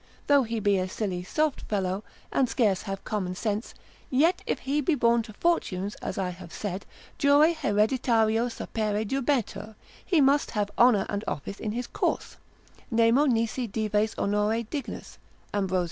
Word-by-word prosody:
Though 285 -1 +5
he 230 -2 -2
be 200 -2 +2
a 185 0 -2
silly 185 -3 -3
soft 300 +10 0
fellow, 195 -1 -2 0.3
and 260 -3 +2
scarce 205 -7 +2
have 195 -2 -6
common 185 -4 -2
sense, 210 +2 -3 0.3
yet 315 +7 +3
if - - 0
he 280 +3 0
be 295 +3 +2
borne 235 -2 +3
to 220 -1 -10
fortunes 205 - 0
(as - - -4
I 190 -2 -1
have 175 -1 -11
said) 195 -2 -5 0.3
jure 285 +3 +6
haereditario 225 -3 +2
sapere 215 -2 -2
jubetur, 245 -3 -1 0.3
he 345 - +2
must 280 +1 +4
have 205 -1 0
honour 235 -5 +5
and 205 0 -3
office 200 +7 -4
in 215 -1 -3
his 245 +2 -3
course: - - -2 0.5
Nemo 230 +5 +4
nisi 230 0 0
dives 215 +1 0
honore 210 +3 +1
dignus 250 +2 -6 0.3
(Ambros. 190 -2 +1
220 Hz, 160 wpm, -27 LUFS, 205-255 Hz, 0.5 s, jure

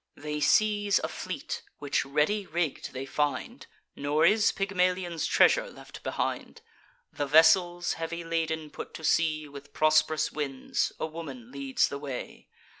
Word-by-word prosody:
They 150 0 -4
seize 205 +6 +3
a - - 0
fleet, - - -5 0.2
which 145 -1 -1
ready 155 +9 +1
rigg'd 165 -2 -2
they 130 +1 -5
find; 145 +1 -2 0.3
Nor 150 +3 +1
is 210 +4 +4
Pygmalion's 180 -3 0
treasure - - +4
left - - -12
behind. - - -3 0.5
The 145 - -2
vessels, 175 +3 +5
heavy 170 +1 -4
laden, 160 -2 -2
put - - -8
to 160 - -9
sea 155 -1 +1
With 145 0 -12
prosp'rous 155 0 +3
winds; 140 -3 -2
a - - -1
woman 140 -7 -8
leads 140 -1 0
the 140 - -6
way. 140 -3 -7
155 Hz, 140 wpm, -28 LUFS, 145-175 Hz, 0.5 s, vessels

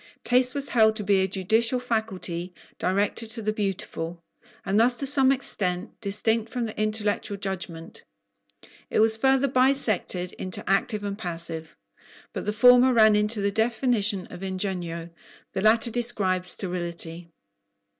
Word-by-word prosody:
Taste 250 +1 +3
was 280 0 -3
held 220 -2 +4
to 215 - -2
be 200 0 +2
a 190 - +1
judicial 220 +6 +1
faculty, 190 -7 -3 0.2
directed 200 +4 0
to 225 +1 -3
the 215 +1 -1
beautiful, 175 -4 -4 0.4
and 200 +2 +1
thus 245 +2 +3
to 275 - -3
some 270 -1 +3
extent 190 -7 -2
distinct 220 +2 0
from 245 -2 -2
the 220 - -7
intellectual 215 -1 -1
judgment. 185 -4 -6 0.9
It - - 0
was 220 0 +5
further 265 +3 +2
bisected 250 -9 +1
into 185 -1 -3
active 200 +2 +1
and 200 0 -5
passive; 165 -3 -3 0.6
but - - -5
the 210 - 0
former 250 +3 +6
ran 220 -2 +5
into 210 +1 +1
the 200 0 0
definition 220 -3 +1
of 180 - -9
"ingegno," 180 -3 -4 0.4
the 190 - -2
latter 225 +3 +3
described 205 -7 +1
sterility. 175 -2 -3
210 Hz, 145 wpm, -25 LUFS, 185-230 Hz, 0.9 s, former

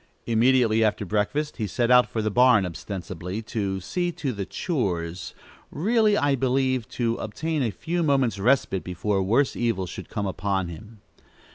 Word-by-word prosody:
Immediately 115 -1 +3
after 105 -1 0
breakfast, 110 - -1
he 110 -4 -2
set 120 +4 0
out 125 0 +6
for 110 - -2
the 110 - 0
barn, 125 -3 +5
ostensibly 90 +2 -6
to 100 -4 -2
"see 175 - -2
to 140 -5 -3
the 100 -2 -5
chores;" 90 - -3 0.3
really, 215 +5 +2
I 145 -1 +2
believe, 130 -2 0
to 115 -1 0
obtain 155 +8 -3
a 120 - +1
few 170 - -3
moments' 135 - +1
respite, 115 -4 +2
before 95 +3 -1
worse 115 +9 +2
evil 115 -6 0
should - - -8
come 100 - -3
upon 95 -1 -1
him. 105 +5 -11
115 Hz, 160 wpm, -25 LUFS, 100-130 Hz, 0.3 s, out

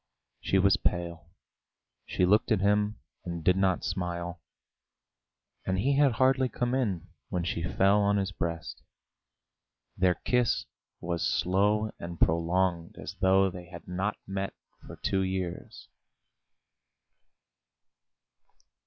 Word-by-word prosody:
She 95 - +1
was 95 0 +4
pale; 85 -3 -2 0.8
she 90 - +1
looked 105 +5 +3
at 110 - +4
him, 105 +2 +2 0.3
and 85 -2 -5
did 90 +3 +4
not 95 -1 +1
smile, 90 -3 -3 1.2
and 95 0 -1
he 135 +8 +2
had 140 -3 +4
hardly 130 +1 +3
come 120 0 -1
in 105 -11 -1 0.2
when 90 -1 -1
she 85 -1 -2
fell 95 +4 +3
on 100 0 +2
his 95 -1 -1
breast. 85 -4 -4 1.1
Their 90 -1 +3
kiss 125 -2 +1 0.4
was 85 -1 -2
slow 100 +8 +2
and 85 0 -7
prolonged, 85 +1 +1
as - - -7
though 95 0 +4
they 90 0 -9
had 85 -1 -11
not 95 +4 -2
met 95 0 -4 0.3
for - - -8
two 95 - 0
years. 95 -2 -4
95 Hz, 120 wpm, -29 LUFS, 85-100 Hz, 1.2 s, was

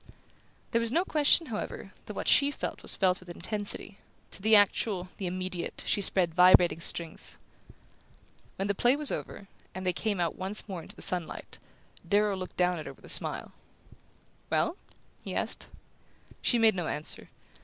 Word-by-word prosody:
There 230 - +1
was 230 -1 -1
no 340 +7 +1
question, 305 +1 +4
however, 225 -7 -6 0.2
that - - -7
what - - -5
she 280 0 +5
felt 290 - -6
was - - +1
felt 185 -2 +1
with 180 - -16
intensity: 205 +3 -4 0.3
to - - -11
the 220 +2 +4
actual, 200 -2 +2
the 190 - -4
immediate, 185 -1 -4
she 205 - +1
spread 180 -3 +4
vibrating 180 -1 +5
strings. 170 -1 0 1.2
When 195 - -3
the 200 - +1
play 245 +6 +2
was 295 -1 +1
over, 200 - -6 0.3
and 185 0 -6
they 180 - +1
came 205 -2 -2
out 170 -2 -1
once 195 +4 -2
more 185 -4 -6
into - - -10
the - - -6
sunlight, 180 -3 -4 0.5
Darrow 205 0 +2
looked 185 -1 -8
down 180 -1 +1
at 155 - -8
her 135 - -8
with - - -19
a - - -10
smile. - - +5 1.0
"Well?" 335 - 0 0.5
he - - -6
asked. - - -3 0.7
She 240 - +2
made 225 -1 +4
no 175 -4 -3
answer. 150 - -1
190 Hz, 175 wpm, -28 LUFS, 180-220 Hz, 1.2 s, she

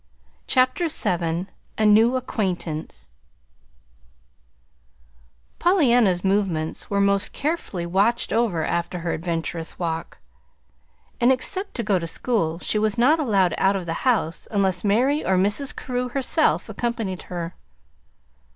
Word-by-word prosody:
CHAPTER 260 +7 +2
VII 175 - -1 0.3
A 220 - +2
NEW 220 +4 +5
ACQUAINTANCE 175 - -3 2.5
Pollyanna's 245 - +3
movements 190 -5 0
were 200 - 0
most 200 0 +2
carefully 285 - -3
watched 200 +7 +1
over 215 -9 +1
after 170 +1 -2
her 170 0 -2
adventurous 165 0 -3
walk; 165 -2 -4 1.0
and, 240 +2 +4
except 380 +10 -2
to 235 - -2
go 200 -4 +1
to 165 - -5
school, 165 -4 -1
she 210 +4 -1
was 215 +1 +1
not 285 +7 +4
allowed 200 - +2
out 195 +1 +3
of 190 -3 -3
the 165 - -2
house 220 -10 0
unless 190 -4 0
Mary 250 +9 +2
or 190 - +2
Mrs. 205 +9 0
Carew 250 -1 -3
herself 275 +5 +1
accompanied 225 -6 -3
her. 175 -1 -4
200 Hz, 125 wpm, -23 LUFS, 175-245 Hz, 2.5 s, NEW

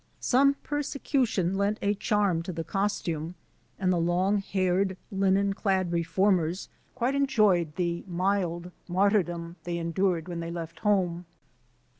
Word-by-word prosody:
Some 275 +2 +4
persecution 270 - 0
lent 200 +2 +1
a 205 - +1
charm 205 -5 +1
to 175 - -5
the 165 -1 -4
costume, 175 -3 -2 0.4
and 185 -1 +1
the 175 - +1
long 180 +4 +2
haired, 190 -1 0
linen 195 0 +2
clad 190 -3 0
reformers 170 +1 +1 0.3
quite 250 +2 0
enjoyed 210 - +2
the 170 -1 -1
mild 180 -1 -1 0.2
mar 195 +3 +3
tyrdom 175 -4 -1
they 175 0 -3
endured 170 0 0
when 175 -2 -4
they 165 0 -4
left 165 -1 -6
home. 180 -4 +1
185 Hz, 135 wpm, -28 LUFS, 170-200 Hz, 0.4 s, Some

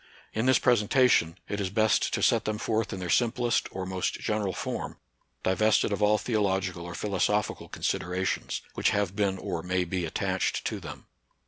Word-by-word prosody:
In 110 +3 0
this 130 - +6
pres 120 -4 +3
entation, 105 -7 +3
it 105 0 -3
is 95 - -1
best 110 +2 +2
to - - -2
set 115 -2 +3
them 110 0 -1
forth 110 0 -1
in 95 - -4
their 90 - -4
simplest 120 -1 +2
or 95 -1 -5
most 95 -1 -2
general 105 -3 -1
form, - - -4 0.5
divested 105 +2 +2
of 100 - -3
all 105 +1 +4
theological 95 -6 -1
or 85 - -7
philosophical 105 +1 -1
considerations, 90 +2 -2
which - - +2
have 100 -2 0
been 100 -2 +1
or 85 -2 -4
may 90 +1 0
be 90 +1 -2
attached 80 - -1
to - - -2
them. - - -9
100 Hz, 180 wpm, -28 LUFS, 95-110 Hz, 0.5 s, this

